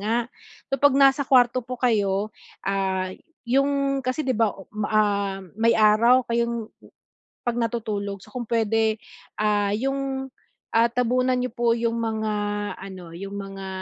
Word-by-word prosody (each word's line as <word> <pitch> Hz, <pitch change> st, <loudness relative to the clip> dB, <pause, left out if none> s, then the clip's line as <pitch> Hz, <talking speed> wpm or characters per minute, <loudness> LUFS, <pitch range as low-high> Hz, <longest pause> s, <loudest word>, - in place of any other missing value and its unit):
nga, 215 Hz, +3 st, 0 dB, 0.6 s
kapag 275 Hz, 0 st, +4 dB
nasa 275 Hz, 0 st, +5 dB
kwarto 255 Hz, -1 st, +5 dB
po 250 Hz, +1 st, -6 dB
kayo, 210 Hz, -4 st, +1 dB, 0.3 s
ah, 190 Hz, -1 st, -1 dB, 0.3 s
yung, 275 Hz, +2 st, +1 dB
kasi 255 Hz, +4 st, -2 dB
'di 260 Hz, -, +1 dB
ba, 225 Hz, -2 st, +3 dB
oh, 195 Hz, -, -11 dB, 0.2 s
ah, 200 Hz, -2 st, +1 dB, 0.2 s
may 230 Hz, +1 st, +4 dB
araw 230 Hz, +4 st, +5 dB
kayong 235 Hz, -1 st, -1 dB, 0.8 s
pag 240 Hz, -1 st, -1 dB
natutulog, 210 Hz, -3 st, -2 dB
so -, -, -16 dB
kung 245 Hz, -3 st, -4 dB
puwede 225 Hz, -1 st, +1 dB, 0.8 s
yung, 270 Hz, +1 st, -2 dB, 0.4 s
ah, 230 Hz, +1 st, +4 dB
tabunan 250 Hz, +1 st, +1 dB
nyo 250 Hz, -1 st, -2 dB
po 235 Hz, -1 st, +2 dB
yung 230 Hz, 0 st, -1 dB
mga 220 Hz, -1 st, -1 dB, 0.5 s
ano, 185 Hz, -3 st, -9 dB
yung 195 Hz, +3 st, -7 dB
mga 195 Hz, -1 st, -7 dB
230 Hz, 135 wpm, -24 LUFS, 205-255 Hz, 0.8 s, nasa